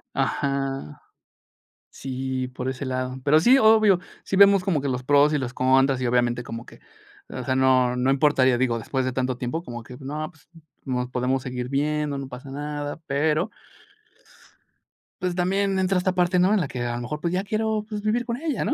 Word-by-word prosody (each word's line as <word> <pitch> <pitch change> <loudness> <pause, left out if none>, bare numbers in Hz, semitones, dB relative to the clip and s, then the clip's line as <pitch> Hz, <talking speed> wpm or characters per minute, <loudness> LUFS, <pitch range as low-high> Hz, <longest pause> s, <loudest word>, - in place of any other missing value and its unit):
Ajá 135 - -2 0.9
sí, 130 -1 -4
por 125 0 -5
ese 130 +1 -4
lado. 130 0 -3
Pero 150 +2 +5
sí, 250 +9 +6
obvio, 215 -5 +5 0.2
sí 195 - -3
vemos 200 -1 +6
como 175 -6 0
que 140 - -1
los 125 -1 -2
pros 145 +2 +4
y 150 - +1
los 125 -3 -4
contras, 130 +1 +3
y 125 - -1
obviamente 120 0 +1
como 115 0 -7
que, - - -15 0.5
o - - -5
sea, 130 -1 -1
no 130 -1 +3
no 125 +2 +1
importaría, 135 -3 +3
digo, 120 -2 +1
después 130 +3 -2
de 130 - -1
tanto 130 -1 -1
tiempo, 125 +7 -3
como 120 -4 -7
que 125 +2 -11
no, 150 +3 -5
pues, 160 -4 -25 0.4
nos 125 -1 -2
podemos 125 +1 -1
seguir 125 -1 -4
viendo, 150 +1 -1
no 135 -1 -6
pasa 130 +1 -9
nada, 145 +1 -5
pero 155 +7 0 1.7
pues, 180 -1 -2
también 195 +2 +1
entra 190 0 +1
esta 185 +1 0
parte, 180 0 +2
¿no? 185 +3 +4
En 215 - +3
la 165 - -1
que 125 -2 -6
a 120 0 -2
lo 120 - -4
mejor 150 +5 -5
pues 170 +1 -1
ya 185 +1 0
quiero, 215 +1 -1
pues, 210 -1 -5
vivir 225 +3 0
con 235 0 -3
ella, 310 -1 -2
¿no? - - +1
140 Hz, 200 wpm, -24 LUFS, 130-180 Hz, 1.7 s, sí